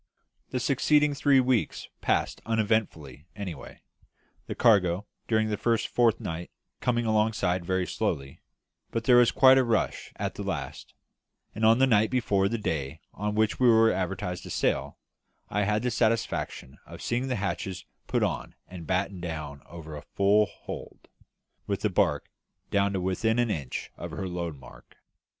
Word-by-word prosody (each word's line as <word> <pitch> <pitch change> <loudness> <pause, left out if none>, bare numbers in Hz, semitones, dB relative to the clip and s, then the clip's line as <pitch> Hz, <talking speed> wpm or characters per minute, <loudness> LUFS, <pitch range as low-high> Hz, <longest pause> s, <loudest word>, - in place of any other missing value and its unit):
The 130 - -2
succeeding 145 +3 +3
three 140 -1 +4
weeks 125 -3 0
passed - - 0
uneventfully 105 - -1
away, 90 -9 -7 0.6
the - - -4
cargo, 100 -3 +3 0.2
during 110 -1 +2
the 105 - -1
first 115 +1 +1
fortnight, 90 -8 0 0.3
coming 120 -1 0
alongside 105 -5 +1
very 95 +1 0
slowly; 70 -5 -3 0.5
but 115 - -2
there 125 +1 +6
was 120 -1 +6
quite 130 0 +6
a - - +4
rush 115 -3 -1
at - - -3
the - - -7
last, - - -5 0.6
and 110 - -5
on 110 +1 +6
the 135 - +5
night 110 -4 +3
before 100 -6 +1
the 115 - -1
day 75 -10 -3
on 105 +1 -3
which 110 0 +1
we 125 -1 +5
were 115 0 +6
advertised 90 -1 -3
to - - -10
sail, - - -1 0.5
I 105 0 0
had 105 +2 0
the 125 - 0
satisfaction 110 - -1
of - - -10
seeing 125 +3 -1
the 130 - -1
hatches 95 -2 -3 0.2
put - - +1
on - - -2
and 90 -3 -9
battened 95 0 -1
down 75 -4 -5
over 80 -2 -9
a 75 - -7
full 100 +2 +4
hold, - - -10 0.6
with - - -2
the - - 0
barque - - +1 0.4
down 100 0 +2
to 95 - -1
within 95 +5 0
an 120 -2 +2
inch 70 -8 -4
of - - -6
her 95 - -5
load 85 -4 -4
mark. 65 -2 -16
105 Hz, 165 wpm, -27 LUFS, 90-115 Hz, 0.6 s, there